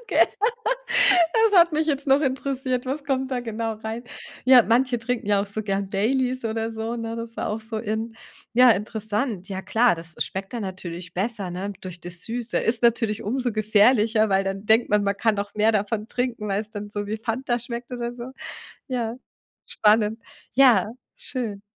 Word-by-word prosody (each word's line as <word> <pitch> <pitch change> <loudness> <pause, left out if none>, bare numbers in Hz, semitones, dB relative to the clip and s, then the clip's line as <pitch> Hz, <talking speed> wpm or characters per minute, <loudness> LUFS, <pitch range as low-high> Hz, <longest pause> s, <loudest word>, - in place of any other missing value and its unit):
gell, - - +4 1.1
das 445 -3 +4
hat 340 -1 +6
mich 310 +1 +1
jetzt 285 -2 0
noch 270 +2 +5
interessiert, 265 -2 -1
was 275 +2 -4
kommt 265 -1 -1
da 250 -2 -1
genau 225 -1 -3
rein? 220 +2 -6 0.4
Ja, 255 -2 +8
manche 245 +2 +2
trinken 230 -2 -3
ja 205 -1 +3
auch 200 - -3
so 210 +2 -5
gern 195 -1 -2
Baileys 255 +5 0
oder 225 0 -2
so, 225 +1 -4
ne, 230 0 -4
das 230 0 -7
war - - -2
auch 215 +1 -3
so 220 0 -5
in, 220 +1 -3 0.4
ja, 250 +1 +7
interessant, 215 -1 -1
ja, 190 -1 -4
klar, 235 -2 +3
das 165 -1 -8
schmeckt 195 0 -3
dann 235 -3 -3
natürlich 180 -2 -7
besser, 200 0 -2
ne, 190 +3 -4
durch 180 -2 -7
das 175 0 -7
Süße 235 0 -2
ist 230 +1 +1
natürlich 225 -2 +2
umso 250 +3 -1
gefährlicher, 215 +1 +3
weil 195 0 +2
dann 195 +1 -4
denkt 220 +1 +4
man, 210 0 +3
man 200 0 0
kann 220 +1 +2
noch 200 0 -4
mehr 215 +1 +3
davon 210 +1 -1
trinken, 240 -4 -3
weil 195 +1 0
es 215 0 -7
dann 205 -1 -7
so 205 -1 -4
wie 215 - -2
Fanta 240 +2 -2
schmeckt 235 +1 -5
oder 240 -1 -3
so, 240 -1 -8 0.6
ja, 240 -3 -2 0.5
spannend, 215 +1 +2 0.4
ja, 245 -8 +6 0.3
schön. 250 - -4
225 Hz, 190 wpm, -24 LUFS, 205-245 Hz, 1.1 s, Ja